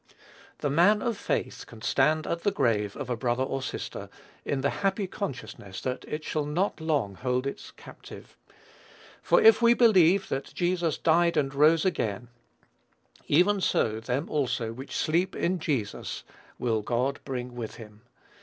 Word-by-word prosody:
The 145 - 0
man 190 +8 +4
of 235 -3 0
faith - - -3
can 115 -1 -13
stand 155 +3 +2
at 170 - -2
the 205 - +2
grave 115 - 0
of 145 - -5
a 125 - -1
brother 120 +2 0
or 135 0 -3
sister, 130 - -6 0.3
in 140 -2 -2
the 140 - +1
happy 195 +1 +1
consciousness 110 - -6
that 130 0 -4
it 155 +1 -5
shall 155 -1 -2
not 175 +4 -1
long 145 -11 0
hold 125 +5 -1
its 140 - -5
captive, - - -13 0.9
"For - - +4
if 445 - +6
we 235 0 +6
believe 195 -5 +5
that 135 +1 -4
Jesus 175 -2 0
died 170 0 +3
and 135 -2 +1
rose 155 +4 +4
again, 120 - -1 1.0
even 190 +6 +3
so 110 -10 +1
them 125 +6 -2
also 125 -6 -1
which 130 +4 -8
sleep 175 +4 0
in 180 +1 0
Jesus 130 -11 -3 0.3
will 115 -3 0
God 125 +6 -1
bring 125 -2 -5
with 115 -3 -6
him." 105 -2 -13
145 Hz, 160 wpm, -27 LUFS, 120-175 Hz, 1.0 s, if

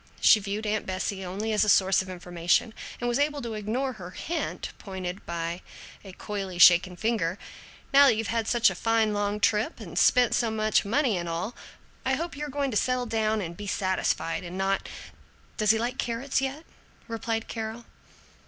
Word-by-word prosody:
she 220 - +6
viewed 205 +2 -4
Aunt 215 0 -1
Bessie 190 +1 -3
only 200 +5 -3
as 210 - +3
a 210 - +1
source 190 -1 +4
of 190 - -8
information, 175 +4 0 0.3
and 240 - -2
was 240 +2 +1
able 290 0 +1
to 230 -1 -4
ignore 230 +6 -2
her 185 -6 -9
hint, 325 - -4
pointed 190 -1 -6
by 170 +1 -3 0.4
a 195 - -10
coyly 195 -1 -5
shaken 180 +1 +7
finger, 200 -4 -1 0.6
"Now 280 0 +8
that 240 - +4
you've 220 -1 -3
had 225 -1 -1
such 240 -1 +4
a - - -4
fine 225 -2 +1
long 205 0 -1
trip 215 +1 +1
and 180 -7 -4
spent 250 -2 +4
so 235 - +1
much 215 0 +1
money 235 -1 +1
and 170 0 -4
all, 170 +8 -3 0.5
I 265 0 +1
hope 335 +2 -4
you're 295 +1 -5
going 280 -1 -1
to 210 - 0
settle 255 +1 +1
down 220 -1 0
and 170 -2 -5
be 205 +3 -8
satisfied 185 -4 -1
and 175 +1 -7
not 195 0 -1 0.3
" - - -30
"Does 215 -1 +1
he 220 - +6
like 240 +3 -3
carrots 240 +4 -1
yet?" 275 +4 -4 0.4
replied 225 -1 -3
Carol. 225 +1 -5
215 Hz, 190 wpm, -27 LUFS, 190-235 Hz, 0.6 s, Now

